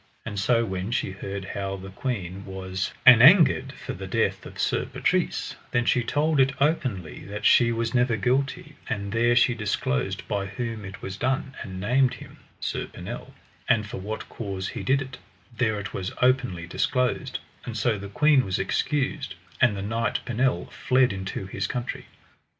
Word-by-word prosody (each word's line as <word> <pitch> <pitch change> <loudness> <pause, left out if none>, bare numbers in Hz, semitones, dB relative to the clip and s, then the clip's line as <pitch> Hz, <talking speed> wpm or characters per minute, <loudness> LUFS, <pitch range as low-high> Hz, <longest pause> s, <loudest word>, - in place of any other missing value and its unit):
And 105 -3 -3
so 115 +3 +3
when 95 0 -3
she 120 -4 -1
heard 100 0 -6
how 95 0 -3
the 95 0 -9
queen 100 -5 -4
was 95 -1 -4
an 125 -3 +10
angered 135 -3 +7
for - - -7
the 95 +1 -7
death 95 -2 0
of - - -12
Sir - - 0
Patrise, - - 0
then 120 0 +1
she 125 - +3
told 150 +4 +1
it 135 0 +4
openly 130 - 0
that 105 +2 -6
she 120 -1 +6
was 115 0 -1
never 120 -2 +2
guilty; 130 +5 -1
and 100 -1 -3
there 120 +2 +3
she 125 +1 +5
disclosed 95 - -1
by 100 -1 -1
whom 110 +1 -4
it 95 0 -9
was 95 +1 -5
done, 130 +3 -1
and 95 -2 -6
named 125 +6 +2
him, - - -13 0.2
Sir - - -3
Pinel; - - -8 0.3
and 110 -2 +3
for 105 - -6
what 105 +3 -5
cause 95 -4 -4
he - - -5
did 135 +1 +2
it, 130 -1 -10 0.4
there 110 -3 +1
it 100 - -6
was 95 -1 -3
openly 125 -9 +2
disclosed; 125 +8 0 0.3
and 115 -2 -5
so 115 -3 +1
the 100 0 -7
queen 145 +5 +4
was 95 -2 -1
excused, 140 +5 -1 0.3
and 115 -5 +4
the 95 - -4
knight 115 +3 -1
Pinel 120 -6 +1
fled 130 -3 +2
into 95 0 -4
his 95 +1 -3
country. 125 0 -4
115 Hz, 180 wpm, -26 LUFS, 95-125 Hz, 0.4 s, an